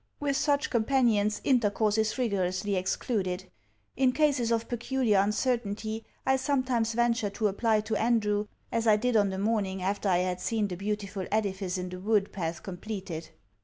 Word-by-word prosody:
With 285 -1 0
such 285 0 +1
companions 225 -4 +2
intercourse 215 -4 +2
is 220 +1 0
rigorously 200 -4 0
excluded. 185 -1 -2 0.4
In 260 -1 +3
cases 280 -6 +2
of 230 0 0
peculiar 240 -3 +1
uncertainty, 220 0 -1 0.2
I 265 0 +3
sometimes 255 -4 0
venture 235 -2 +1
to 210 +2 0
apply 215 +2 +1
to 220 +1 -2
Andrew, 210 -3 +1 0.2
as 230 0 0
I 215 - +7
did 245 +3 0
on 205 -2 +4
the 190 - -4
morning 195 -2 -1
after 200 +1 0
I 180 - +4
had 180 0 -3
seen 215 0 0
the 180 - -4
beautiful 200 0 -3
edifice 195 -3 -1
in 180 0 -4
the 180 0 -7
wood 205 0 +1
path 170 -3 -4
completed. 185 -4 -6
215 Hz, 165 wpm, -29 LUFS, 195-235 Hz, 0.4 s, I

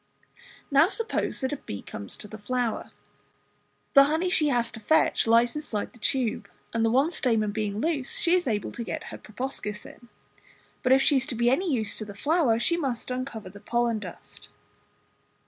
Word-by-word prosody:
Now 280 +4 +6
suppose 455 +3 -1
that 260 +1 -1
a - - -3
bee 100 - -7
comes 100 -1 -8
to 210 - -8
the 215 +1 -10
flower. 240 +1 -2 1.0
The 275 -1 +9
honey 320 +5 0
she 310 -5 +3
has 245 -4 +1
to - - -8
fetch 315 +2 +2
lies 235 +2 +4
inside 265 -9 -4
the 235 - -18
tube, 230 -4 0 0.2
and 230 -1 +1
the 225 - +3
one 270 +8 +3
stamen 225 -9 +1
being 210 -1 -2
loose 295 -2 -1
she 340 - +2
is 360 -4 +2
able 210 -4 -1
to 235 - -5
get - - -4
her - - -7
proboscis 215 -2 -5
in. 240 - -14 0.7
but 255 - +1
if 270 +1 +6
she 290 -2 +4
is 265 +1 0
to 255 - -3
be 235 +1 +3
of - - +4
any 350 +5 0
use 220 -6 0
to 215 - -4
the 200 -1 -9
flower 285 - +2
she 340 +8 +1
must 260 -6 -3
uncover 250 -6 -5
the 205 - -12
pollen 235 0 0
dust. 185 -4 -11
240 Hz, 200 wpm, -27 LUFS, 220-280 Hz, 1.0 s, The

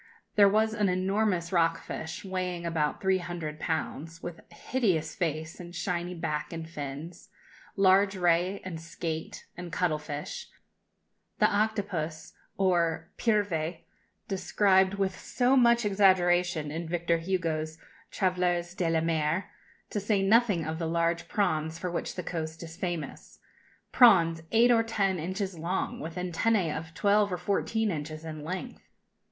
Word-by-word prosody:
There 200 -1 +7
was 220 +2 +2
an 210 -3 +1
enormous 185 -1 0
rock 165 -2 +2
fish, 160 +3 -6
weighing 180 -2 -3
about 160 -3 0
three 190 0 +3
hundred 170 -4 -5
pounds, 160 0 -3
with 175 -1 -6
hideous 170 -5 0
face 160 -2 -3
and 175 0 -9
shiny 175 +1 -2
back, 155 -3 -3
and 165 -1 -6
fins; 150 +2 -7 0.5
large 195 +1 +4
ray, 180 +2 +2
and 165 -3 -5
skate, 165 -1 -5
and 175 0 -7
cuttle 165 -4 0
fish 150 -1 -6 0.9
the - - +4
octopus, 205 -7 -1 0.2
or 170 -4 +1
pieuvre, 195 -7 +1 0.5
described 190 0 +3
with 195 -2 -1
so 255 +1 +2
much 235 -2 +5
exaggeration 175 -5 +3
in 165 +1 -4
Victor 170 -1 +1
Hugo's 165 -3 -2 0.3
"Travailleurs 180 -2 0
de 180 -3 0
la 165 -1 +2
Mer," 165 +4 0 0.4
to 210 - -1
say 200 -1 +1
nothing 205 -5 +3
of 160 +1 -3
the 165 - -1
large 170 0 0
prawns 160 -5 0
for 180 +1 -4
which 170 - -3
the 180 - -4
coast 160 -1 -4
is 165 -1 -9
famous 175 -4 -5 0.5
prawns 170 -9 +6
eight 235 +2 +5
or 230 -1 +5
ten 200 -5 0
inches 185 +1 -3
long, 175 +4 -2
with 160 +1 -6
antennæ 180 0 +1
of 160 0 -6
twelve 205 0 +3
or 180 - -1
fourteen 205 +4 0
inches 155 0 -5
in 155 -2 -6
length. 185 +10 -5
175 Hz, 145 wpm, -29 LUFS, 165-195 Hz, 0.9 s, There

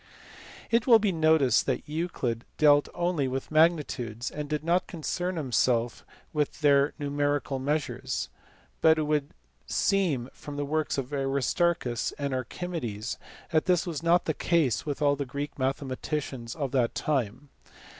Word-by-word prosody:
It 230 +1 +2
will 235 -3 +9
be 210 -2 +1
noticed 155 -7 +3
that - - -1
Euclid 150 -7 -2
dealt 145 -1 +5
only 175 -5 0
with 130 +3 -4
magnitudes, 145 -7 +1
and 150 -1 -5
did 150 -1 -2
not 175 +2 +1
concern 180 +2 -3
himself 125 -5 0 0.3
with 150 0 -1
their 140 -1 +4
numerical 145 -2 -1
measures, 145 +2 -2 0.5
but 160 0 +6
it 155 - +1
would 150 -1 0 0.4
seem 165 - +1
from 145 - -9
the 145 0 -2
works 155 +1 -1
of 135 +1 -4
Aristarchus 135 -1 0
and 140 -2 -3
Archi 130 +7 -4
medes 120 - -4 0.3
that 155 -1 +2
this 180 -2 +2
was 165 -4 -4
not 170 +1 +3
the 155 - 0
case 150 -9 +1
with 145 +1 -2
all 145 0 +4
the 140 - -2
Greek 140 +2 -5
mathe 135 +2 0
maticians 130 -3 -4
of 140 -5 -3
that 125 -4 +1
time. 135 -1 -2
145 Hz, 155 wpm, -28 LUFS, 130-160 Hz, 0.5 s, will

